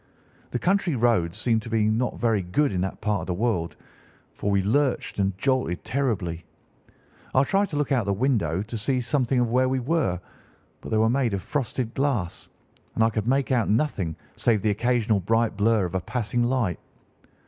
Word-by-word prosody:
The -, -, -2 dB
country 180 Hz, +1 st, +1 dB
roads 110 Hz, -9 st, +1 dB
seem 115 Hz, -2 st, +1 dB
to 110 Hz, -, -8 dB
be 110 Hz, -2 st, +2 dB
not 115 Hz, +3 st, 0 dB
very 115 Hz, -4 st, +2 dB
good 100 Hz, +9 st, 0 dB
in 90 Hz, -, 0 dB
that 95 Hz, -, -4 dB
part 105 Hz, -5 st, 0 dB
of 80 Hz, -, -7 dB
the 90 Hz, -, -1 dB
world, 95 Hz, -5 st, -1 dB, 0.6 s
for 100 Hz, -, -3 dB
we 100 Hz, -1 st, +2 dB
lurched 130 Hz, +2 st, 0 dB
and 95 Hz, -1 st, 0 dB
jolted 130 Hz, -8 st, 0 dB
terribly. 110 Hz, -9 st, -2 dB, 0.9 s
I 130 Hz, -, +6 dB
tried 195 Hz, +6 st, +1 dB
to 155 Hz, -, -5 dB
look 145 Hz, -1 st, -1 dB
out 135 Hz, -, +4 dB
of 110 Hz, -, -2 dB
the 100 Hz, -, +2 dB
windows 100 Hz, -, 0 dB
to 115 Hz, 0 st, -5 dB
see 130 Hz, +4 st, +1 dB
something 125 Hz, +1 st, +1 dB
of 120 Hz, -2 st, +1 dB
where 130 Hz, +1 st, +3 dB
we 130 Hz, 0 st, 0 dB
were, 130 Hz, -, 0 dB, 0.6 s
but -, -, -8 dB
they 110 Hz, -, +1 dB
were 110 Hz, +1 st, +4 dB
made 120 Hz, -3 st, +1 dB
of 95 Hz, -, -5 dB
frosted 125 Hz, -4 st, -2 dB
glass, 125 Hz, -11 st, -2 dB, 0.5 s
and 110 Hz, -, +3 dB
I 115 Hz, -, +3 dB
could 110 Hz, 0 st, -2 dB
make 135 Hz, +1 st, +1 dB
out 120 Hz, -4 st, +2 dB
nothing 105 Hz, -, 0 dB, 0.2 s
save 110 Hz, -4 st, +2 dB
the 110 Hz, -, +3 dB
occasional 115 Hz, -1 st, +1 dB
bright 115 Hz, +4 st, +1 dB
blur 105 Hz, -1 st, +2 dB
of 90 Hz, -, -5 dB
a 95 Hz, -, 0 dB
passing 120 Hz, +2 st, -1 dB
light. 120 Hz, -, 0 dB
115 Hz, 200 wpm, -25 LUFS, 100-130 Hz, 0.9 s, I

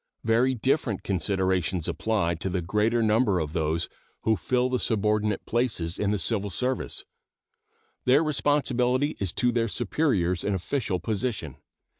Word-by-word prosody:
Very 120 Hz, +4 st, +3 dB
different 125 Hz, -, 0 dB
considerations 95 Hz, -2 st, 0 dB
apply 105 Hz, -7 st, 0 dB
to 85 Hz, +3 st, -4 dB
the 90 Hz, -1 st, -2 dB
greater 105 Hz, +6 st, +1 dB
number 110 Hz, -3 st, +3 dB
of 75 Hz, -1 st, -3 dB
those 80 Hz, 0 st, 0 dB, 0.4 s
who 110 Hz, -, +3 dB
fill 125 Hz, +3 st, +1 dB
the 130 Hz, -1 st, 0 dB
subordinate 105 Hz, -2 st, 0 dB
places 110 Hz, -8 st, -1 dB
in 100 Hz, -, +1 dB
the 105 Hz, -, +1 dB
civil 100 Hz, +2 st, 0 dB
service. 125 Hz, +7 st, -2 dB, 1.0 s
Their 135 Hz, +5 st, +5 dB
responsibility 145 Hz, -2 st, +1 dB
is 95 Hz, -3 st, -1 dB
to 125 Hz, -1 st, +2 dB
their 115 Hz, -1 st, +1 dB
superiors 100 Hz, -, 0 dB
in 100 Hz, -, 0 dB
official 95 Hz, 0 st, -2 dB
position. 100 Hz, -, -3 dB
105 Hz, 140 wpm, -26 LUFS, 95-125 Hz, 1.0 s, Their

